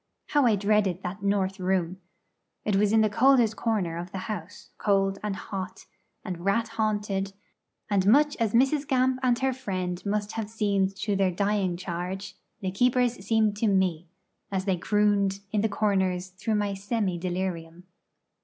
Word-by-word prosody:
How 290 -4 +4
I 220 - +4
dreaded 200 -2 +1
that 185 +3 -5
'north 200 -1 0
room'! 185 -1 0 0.7
It 210 - +1
was 205 +1 +3
in 220 0 +5
the 215 +2 0
oldest 245 -5 +5
corner 200 -9 -1
of 175 +1 -7
the - - -5
house, 205 -4 -7
cold 195 -1 +1
and 210 -2 -2
hot, 190 -1 -6 0.4
and 175 -2 -5
rat 220 +4 +1
haunted; 205 -3 -1 0.5
and 195 -2 +1
much 290 +6 +5
as 225 -4 0
Mrs. 270 +4 +3
Gamp 255 0 +2
and 250 -2 +2
her 265 +1 0
friend 185 -8 -4
must 205 0 -1
have 220 -2 -4
seemed 200 -3 0
to 205 +1 -1
their 195 -1 +2
dying 195 -1 0
charge, 180 +2 -5 0.3
the 190 -1 -2
keepers 245 +1 +1
seemed 215 0 +2
to 225 - +1
me, 185 -4 +1 0.4
as 190 -1 -1
they 190 -2 +2
crooned 200 0 +1
in 210 - +1
the 220 - +1
corners 190 -3 0
through 210 +4 -2
my 205 -1 0
semi 195 -2 -2
delirium. 175 -2 -4
200 Hz, 165 wpm, -27 LUFS, 190-220 Hz, 0.7 s, in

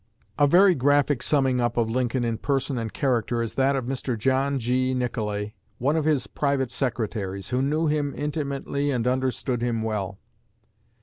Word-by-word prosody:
A 145 - +6
very 185 +5 +6
graphic 145 -1 +2
summing 135 -4 +2
up 120 0 -1
of 115 -1 +2
Lincoln 125 +1 0
in 115 -1 -1
person 135 -2 -1
and 115 -2 -4
character 120 -3 0
is 115 -1 -2
that 135 +1 +2
of 130 -3 -2
Mr. 125 -1 -3
John 135 +4 +1
G. 130 +1 0
Nicolay, 105 -4 -2 0.2
one 140 +5 +1
of 160 -2 0
his 150 -5 +2
private 140 -3 -1
secretaries, 105 -7 -3
who 125 +1 0
knew 150 +4 +1
him 150 -2 0
intimately 145 -1 -2
and 125 -4 0
understood 130 -1 -1
him 115 -2 -1
well. 100 -3 -3
130 Hz, 170 wpm, -25 LUFS, 115-140 Hz, 0.2 s, A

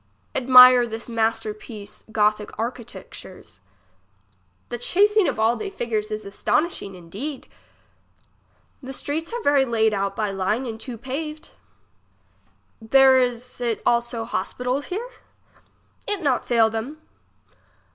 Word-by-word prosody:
Admire 250 -1 +8
this 225 0 -6
master 225 -2 0
piece 210 -1 -11
gothic 210 -1 +1
architecture's. 215 - -8 1.1
The 240 - -5
chasing 410 - +3
of - - -2
all 225 +2 +3
they 405 - -5
figures 225 - -3
is 215 0 -5
astonishing 200 - -1
indeed. 205 - -7 1.3
The 270 0 -7
streets 310 - -4
are 475 -1 -4
very 285 -1 +4
layed 220 -3 +1
out 195 0 -1
by 210 -1 -1
line 195 +6 -1
and 225 -2 -6
too 240 0 -7
paved. 300 +6 -6 1.3
There 265 +3 +6
is 250 0 -2
it 235 -3 -1
also 235 -1 0
hospitals 250 +3 -2
here? 430 +7 -4 1.0
It 410 -4 -2
not 265 -4 +1
fail 230 -2 +3
them. 235 +8 -5
240 Hz, 120 wpm, -23 LUFS, 220-270 Hz, 1.3 s, Admire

